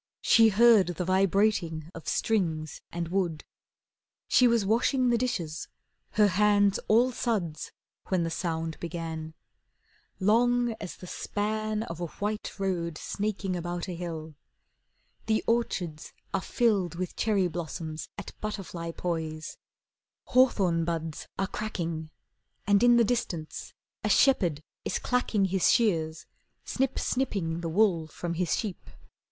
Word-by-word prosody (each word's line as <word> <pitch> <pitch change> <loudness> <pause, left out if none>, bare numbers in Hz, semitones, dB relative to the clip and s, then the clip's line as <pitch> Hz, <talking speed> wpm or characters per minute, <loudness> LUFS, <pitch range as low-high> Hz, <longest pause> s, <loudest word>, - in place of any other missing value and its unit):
She 225 -1 +6
heard 220 -2 +6
the 175 0 -3
vibrating 185 -4 +1
of 160 -2 -10
strings 160 -8 0
and 170 -1 -3
wood. 175 -4 -1 0.8
She 250 - +5
was 230 -3 +2
washing 250 +4 +2
the 235 - +3
dishes, 175 -11 -2 0.5
her 210 - +5
hands 205 +1 +3
all 240 +4 +4
suds, 200 -11 -2 0.4
When 185 -3 +1
the 165 - -2
sound 165 -1 -3
began, 160 -2 -5 0.8
Long 240 +4 +3
as 190 - -6
the - - -11
span 215 +3 -2
Of 170 -6 -7
a 175 - -2
white 210 +5 -3
road 175 -5 -2
snaking 200 -1 -2
about 175 +1 -3
a 180 - -4
hill. 165 -2 -6 0.9
The 220 -1 +2
orchards 180 -9 -1 0.2
are - - +1
filled 200 -6 +1
With 180 0 -4
cherry 205 -5 +2
blossoms 160 -1 -5
at 200 - -7
butterfly 190 -5 -4
poise. 160 -3 -4 0.7
Hawthorn 195 -10 +4
buds 165 -2 -3
are 195 - +1
cracking, 170 -7 -4 0.6
And 200 0 +4
in 240 0 +6
the 235 - +6
distance 195 -9 -2 0.3
a - - 0
shepherd 180 - +4 0.2
is - - -1
clacking 240 -5 +1
His 190 -1 +3
shears, 160 -8 +1 0.4
snip 265 -1 -1
snipping 190 -11 -1
the 165 - -3
wool 175 -3 +2
from 170 +2 -4
his 175 0 0
sheep. 205 -5 -5
185 Hz, 130 wpm, -28 LUFS, 165-215 Hz, 0.9 s, She